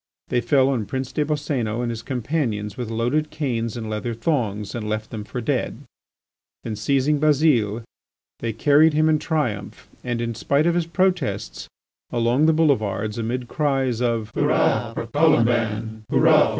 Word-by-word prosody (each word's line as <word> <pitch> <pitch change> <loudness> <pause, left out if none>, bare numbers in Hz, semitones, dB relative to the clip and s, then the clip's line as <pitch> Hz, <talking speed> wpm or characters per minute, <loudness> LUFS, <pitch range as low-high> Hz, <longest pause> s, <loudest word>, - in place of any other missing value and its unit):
They 125 - +1
fell 130 +3 +3
on 120 -7 -1
Prince 130 -1 -3
des 150 - 0
Boscénos 140 -7 -1
and 120 - -1
his 115 -1 -5
companions 120 -5 -2
with 120 -3 -5
loaded 125 +7 0
canes 120 -7 -2
and 110 -2 -5
leather 110 +2 -3
thongs, 110 -6 -1
and 110 -3 -4
left 110 0 -3
them 110 -2 -5
for 120 +4 -5
dead. 110 - -2 0.8
Then 110 - -4
seizing 140 +6 +1
Bazile 135 -8 +2 0.6
they 115 - -2
carried 145 +7 +4
him 155 +1 +3
in 155 -1 +3
triumph, 125 - -3 0.2
and 120 -1 -2
in 115 0 -2
spite 140 +6 +1
of 170 - +3
his 170 -1 0
protests, 180 -4 -1 0.4
along 120 +5 +2
the - - +6
boulevards, 110 -9 +1
amid 120 +2 -3
cries 135 -5 0
of: 115 -3 -1
"Hurrah - - +1
for - - -3
Colomban! 110 -2 +1
120 Hz, 155 wpm, -23 LUFS, 110-145 Hz, 0.8 s, the